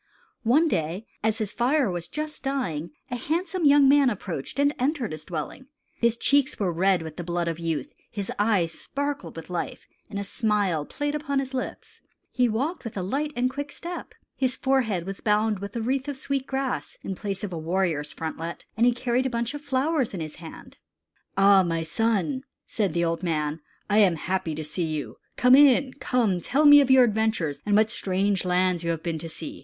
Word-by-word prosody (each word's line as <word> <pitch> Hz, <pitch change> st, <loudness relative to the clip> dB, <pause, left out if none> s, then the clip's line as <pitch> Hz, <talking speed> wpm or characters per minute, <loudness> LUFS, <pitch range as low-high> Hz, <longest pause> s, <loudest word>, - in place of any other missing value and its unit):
One 280 Hz, +9 st, +4 dB
day 175 Hz, -, -2 dB, 0.2 s
as 220 Hz, 0 st, +1 dB
his 210 Hz, -2 st, -2 dB
fire 265 Hz, +2 st, +2 dB
was 175 Hz, -1 st, -3 dB
just 305 Hz, 0 st, -5 dB
dying, 185 Hz, -, -2 dB, 0.2 s
a -, -, -1 dB
handsome 340 Hz, +7 st, -1 dB
young 285 Hz, -1 st, +7 dB
man 280 Hz, -1 st, +6 dB
approached 185 Hz, -, -5 dB
and 285 Hz, +1 st, +3 dB
entered 260 Hz, -3 st, 0 dB
his 155 Hz, 0 st, -7 dB
dwelling. 175 Hz, -, -5 dB, 0.3 s
His 235 Hz, 0 st, +2 dB
cheeks 280 Hz, +1 st, +2 dB
were 185 Hz, -4 st, 0 dB
red 185 Hz, 0 st, +2 dB
with 160 Hz, -1 st, -8 dB
the 175 Hz, -, -4 dB
blood 175 Hz, 0 st, -2 dB
of 165 Hz, 0 st, -2 dB
youth; 165 Hz, -, -3 dB, 0.2 s
his 200 Hz, -3 st, -4 dB
eyes 205 Hz, -6 st, +2 dB
sparkled 280 Hz, -, -4 dB
with 165 Hz, +2 st, -9 dB
life; 175 Hz, -, -4 dB, 0.2 s
and 205 Hz, -, -5 dB
a 200 Hz, -, -2 dB
smile 200 Hz, -8 st, 0 dB
played 290 Hz, 0 st, -3 dB
upon 295 Hz, -2 st, -2 dB
his 270 Hz, -1 st, -2 dB
lips. 255 Hz, -, -6 dB, 0.3 s
He 250 Hz, -1 st, +2 dB
walked 275 Hz, +11 st, -2 dB
with 225 Hz, -3 st, -6 dB
a 185 Hz, -, -2 dB
light 285 Hz, +10 st, -1 dB
and 245 Hz, +1 st, +2 dB
quick 285 Hz, +3 st, -5 dB
step. 345 Hz, +1 st, -7 dB, 0.2 s
His 260 Hz, -1 st, 0 dB
forehead 235 Hz, -10 st, +1 dB
was 195 Hz, +1 st, -6 dB
bound 210 Hz, -1 st, +2 dB
with 200 Hz, +4 st, -7 dB
a 230 Hz, -, -1 dB
wreath 265 Hz, +4 st, -1 dB
of 285 Hz, -2 st, -4 dB
sweet 270 Hz, 0 st, -2 dB
grass, 270 Hz, -1 st, -3 dB
in 195 Hz, -, -3 dB
place 195 Hz, +1 st, -4 dB
of 205 Hz, -, -3 dB
the 170 Hz, -, -4 dB
warrior's 165 Hz, -3 st, -1 dB
frontlet, 165 Hz, +1 st, -5 dB
and 230 Hz, +3 st, +4 dB
he 245 Hz, -, +4 dB
carried 250 Hz, +1 st, 0 dB
a -, -, -2 dB
bunch 235 Hz, +1 st, -2 dB
of 290 Hz, -, -6 dB
flowers 280 Hz, -3 st, 0 dB
in -, -, -4 dB
his 155 Hz, -2 st, -6 dB
hand. 165 Hz, -1 st, -11 dB, 0.6 s
"Ah! 195 Hz, 0 st, +7 dB
my 165 Hz, -2 st, -1 dB
son," 225 Hz, -, 0 dB, 0.2 s
said 200 Hz, -7 st, -1 dB
the 170 Hz, 0 st, +1 dB
old 165 Hz, 0 st, -1 dB
man, 155 Hz, -3 st, -1 dB, 0.3 s
"I 210 Hz, +1 st, +3 dB
am 190 Hz, -5 st, +5 dB
happy 165 Hz, -1 st, -2 dB
to 155 Hz, -, -4 dB
see 160 Hz, +3 st, -2 dB
you. 155 Hz, -2 st, -4 dB, 0.2 s
Come 250 Hz, +1 st, +5 dB
in. 270 Hz, -1 st, +6 dB
Come, 220 Hz, -8 st, +1 dB
tell 285 Hz, -, +2 dB
me 290 Hz, 0 st, +10 dB
of 270 Hz, -, +1 dB
your 260 Hz, -1 st, +7 dB
adventures, 220 Hz, -, 0 dB
and 205 Hz, -, +3 dB
what 215 Hz, +1 st, +4 dB
strange 195 Hz, -1 st, 0 dB
lands 180 Hz, -1 st, +1 dB
you 170 Hz, -, -2 dB
have 165 Hz, -1 st, -2 dB
been 165 Hz, -2 st, -2 dB
to 165 Hz, +1 st, -6 dB
see. 295 Hz, -, -7 dB
215 Hz, 205 wpm, -26 LUFS, 175-265 Hz, 0.6 s, me